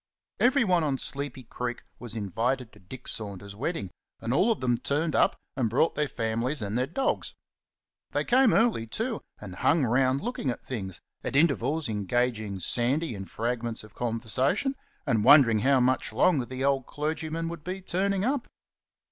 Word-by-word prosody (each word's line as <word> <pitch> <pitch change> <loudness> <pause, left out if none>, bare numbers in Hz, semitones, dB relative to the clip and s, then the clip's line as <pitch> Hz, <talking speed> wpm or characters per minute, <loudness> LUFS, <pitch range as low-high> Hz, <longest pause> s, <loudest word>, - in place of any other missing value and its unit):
Everyone 235 - +4
on 140 -3 0
Sleepy 140 0 -4
Creek 120 +1 -5 0.2
was 120 -2 -7
invited 115 +4 -1
to 105 - -16
Dick 120 +7 -11
Saunders's 100 -2 -6
wedding, 125 - -3 0.3
and 115 +2 -2
all 190 - +4
of 220 - 0
them 120 -2 +1
turned 150 +5 0
up - - +4 0.2
and 125 -5 +1
brought 135 +8 +2
their 150 -1 0
families 115 +4 -1
and 105 -1 -3
their 125 +2 +1
dogs. 270 - -1 0.7
They - - 0
came 255 -1 +5
early, 225 - +2
too, 225 - -3 0.2
and 95 -4 -9
hung 160 - +3
round 130 +3 +2
looking 235 - -2
at 120 - -4
things, 95 -8 -5 0.2
at - - -3
intervals 150 0 +2
engaging 110 -1 -1
Sandy 125 - 0
in 95 -2 -6
fragments 115 +1 -3
of 110 -1 -14
conversation, 125 - 0 0.3
and 115 -7 +2
wondering 125 -4 +7
how 135 +4 +4
much 130 -1 +1
longer 130 +2 +3
the 130 0 -4
old 135 -2 +1
clergyman 160 +2 -3
would 170 -3 -7
be 185 +3 -4
turning 190 +2 0
up. 265 -1 0
130 Hz, 165 wpm, -28 LUFS, 115-160 Hz, 0.7 s, wondering